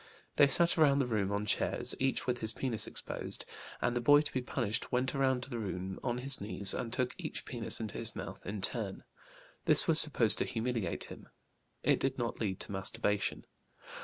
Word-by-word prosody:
They 145 Hz, -, +7 dB
sat 170 Hz, +4 st, +4 dB
around 140 Hz, -3 st, +5 dB
the 140 Hz, -, +1 dB
room 105 Hz, -5 st, -1 dB
on 100 Hz, +1 st, -2 dB
chairs, -, -, +1 dB
each 135 Hz, 0 st, -1 dB
with 125 Hz, -1 st, -1 dB
his 110 Hz, -1 st, +1 dB
penis 120 Hz, -5 st, -1 dB
exposed, -, -, -4 dB, 0.4 s
and 120 Hz, -, 0 dB
the 120 Hz, -, -1 dB
boy 145 Hz, +4 st, +6 dB
to 150 Hz, -, -4 dB
be 130 Hz, -, -1 dB
punished 120 Hz, -4 st, -3 dB
went 130 Hz, +1 st, 0 dB
around 130 Hz, -2 st, 0 dB
the 125 Hz, -3 st, -6 dB
room 95 Hz, -2 st, -5 dB
on 120 Hz, -2 st, -2 dB
his 130 Hz, -1 st, +2 dB
knees 100 Hz, -1 st, +5 dB
and 115 Hz, -, -4 dB
took 125 Hz, +1 st, 0 dB
each 160 Hz, -4 st, -6 dB
penis 120 Hz, -4 st, -3 dB
into 110 Hz, -3 st, -5 dB
his -, -, -1 dB
mouth -, -, -8 dB
in 105 Hz, +1 st, -5 dB
turn. 100 Hz, -2 st, 0 dB, 0.6 s
This -, -, +5 dB
was -, -, +5 dB
supposed -, -, +4 dB
to -, -, 0 dB
humiliate 115 Hz, -6 st, -3 dB
him. -, -, -12 dB, 0.5 s
It -, -, +2 dB
did 135 Hz, 0 st, -1 dB
not 120 Hz, -2 st, -3 dB
lead 95 Hz, -4 st, -3 dB
to -, -, -5 dB
masturbation. 105 Hz, +1 st, -2 dB
120 Hz, 195 wpm, -32 LUFS, 105-130 Hz, 0.6 s, They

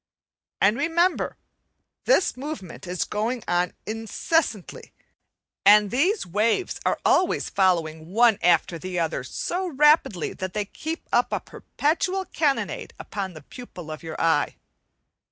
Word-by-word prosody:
And 205 Hz, +4 st, +3 dB
remember, 340 Hz, +4 st, +1 dB, 0.7 s
this -, -, +3 dB
movement 255 Hz, -, -7 dB
is 180 Hz, 0 st, -1 dB
going 225 Hz, +3 st, -2 dB
on 175 Hz, 0 st, +1 dB
incessantly, 225 Hz, -, -2 dB, 0.7 s
and 205 Hz, 0 st, +6 dB
these 350 Hz, -, +1 dB
waves 215 Hz, -, 0 dB
are -, -, +1 dB
always 365 Hz, -, +2 dB
following 165 Hz, -5 st, +1 dB
one 225 Hz, 0 st, +4 dB
after 170 Hz, -1 st, +2 dB
the 185 Hz, 0 st, -5 dB
other 165 Hz, -6 st, -1 dB
so 365 Hz, -, -3 dB
rapidly 295 Hz, -, +3 dB
that 185 Hz, -1 st, -5 dB
they 210 Hz, -1 st, -1 dB
keep 320 Hz, -, -6 dB
up -, -, +2 dB
a -, -, 0 dB
perpetual 365 Hz, +6 st, -2 dB
cannonade 290 Hz, -5 st, -1 dB
upon 195 Hz, -3 st, -5 dB
the 155 Hz, -, -11 dB
pupil 180 Hz, -, -10 dB
of 155 Hz, -, -7 dB
your 160 Hz, -1 st, -7 dB
eye. 160 Hz, -3 st, +2 dB
210 Hz, 130 wpm, -24 LUFS, -, 0.7 s, and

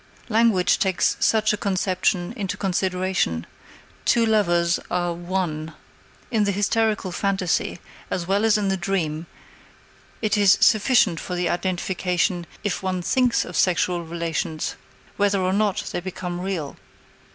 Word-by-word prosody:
Language 220 Hz, -5 st, +3 dB
takes 190 Hz, -3 st, +2 dB
such 220 Hz, -1 st, +3 dB
a -, -, -1 dB
conception 185 Hz, -1 st, 0 dB
into 200 Hz, -4 st, -3 dB
consideration: 185 Hz, -, -1 dB, 0.6 s
two 235 Hz, -1 st, +3 dB
lovers 175 Hz, -6 st, +2 dB
are 175 Hz, -1 st, 0 dB
"one." 170 Hz, -3 st, -3 dB, 0.6 s
In 220 Hz, -3 st, +2 dB
the 200 Hz, -, +1 dB
hysterical 205 Hz, 0 st, 0 dB
phantasy, 190 Hz, -2 st, 0 dB, 0.3 s
as 175 Hz, -, -2 dB
well 200 Hz, +3 st, +1 dB
as 225 Hz, 0 st, +4 dB
in 205 Hz, -2 st, 0 dB
the 190 Hz, -, 0 dB
dream, 170 Hz, -4 st, -2 dB, 0.9 s
it 215 Hz, 0 st, +1 dB
is 200 Hz, -2 st, +6 dB
sufficient 210 Hz, -5 st, +4 dB
for 180 Hz, -, -5 dB
the 175 Hz, -1 st, 0 dB
identification 180 Hz, -1 st, -1 dB, 0.2 s
if 205 Hz, -1 st, -1 dB
one 185 Hz, -2 st, -2 dB
thinks 250 Hz, +4 st, +2 dB
of -, -, -8 dB
sexual 175 Hz, -1 st, +2 dB
relations, 165 Hz, -1 st, -3 dB, 0.4 s
whether 200 Hz, -1 st, +2 dB
or 185 Hz, 0 st, 0 dB
not 205 Hz, -1 st, +1 dB
they -, -, -2 dB
become 180 Hz, -1 st, -5 dB
real. 180 Hz, -7 st, -4 dB
185 Hz, 135 wpm, -23 LUFS, 175-205 Hz, 0.9 s, is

